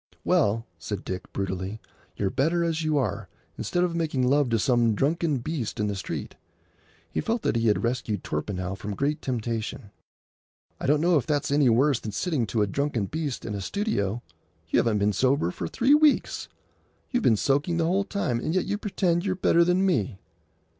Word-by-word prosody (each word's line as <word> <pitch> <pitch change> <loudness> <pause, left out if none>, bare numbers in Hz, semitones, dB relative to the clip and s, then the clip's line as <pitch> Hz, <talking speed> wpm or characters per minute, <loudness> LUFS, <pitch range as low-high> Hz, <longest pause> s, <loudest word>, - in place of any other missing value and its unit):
"Well," 110 +3 +2
said 100 -2 -5
Dick, 95 0 -5
brutally, 95 +2 -3 0.4
"you're 95 -2 0
better 165 +5 +1
as 165 -1 0
you 155 -2 +1
are, 110 -8 -2 0.3
instead 175 - -1
of 175 -2 0
making 150 -6 0
love 140 0 +3
to 115 - +2
some 120 -2 +2
drunken 155 +3 +1
beast 125 -4 -4
in 105 - +1
the 100 -1 -1
street." 95 - -5 0.8
He - - -1
felt 230 0 -1
that - - +1
he 115 0 +2
had 105 - +2
rescued 115 -5 -1
Torpenhow 90 +4 -3
from 100 +2 -5
great 145 +5 -1
temptation. 115 -3 -3 0.9
"I - - -3
don't 150 +2 +3
know 170 0 +4
if 135 - -1
that's 145 -2 0
any 145 -3 +4
worse 130 +3 +3
than 105 - -6
sitting 145 - 0
to 110 0 +1
a - - +3
drunken 125 0 -1
beast 150 +2 -4
in 110 - -3
a 100 - -3
studio. 120 - -1 0.5
You - - +3
haven't 115 -3 +2
been 105 0 +2
sober 130 -7 +2
for 85 - -4
three 255 - +3
weeks. 300 -1 +3 0.6
You've 250 -2 +1
been 115 - +4
soaking 145 - +1
the 165 - +2
whole 190 +4 +2
time; 200 - -1
and 155 +8 -2
yet 185 - +2
you 205 +1 -2
pretend 180 -4 0
you're 190 -2 0
better 170 -2 +4
than 180 +2 +2
me!" 110 - 0
135 Hz, 195 wpm, -26 LUFS, 105-170 Hz, 0.9 s, know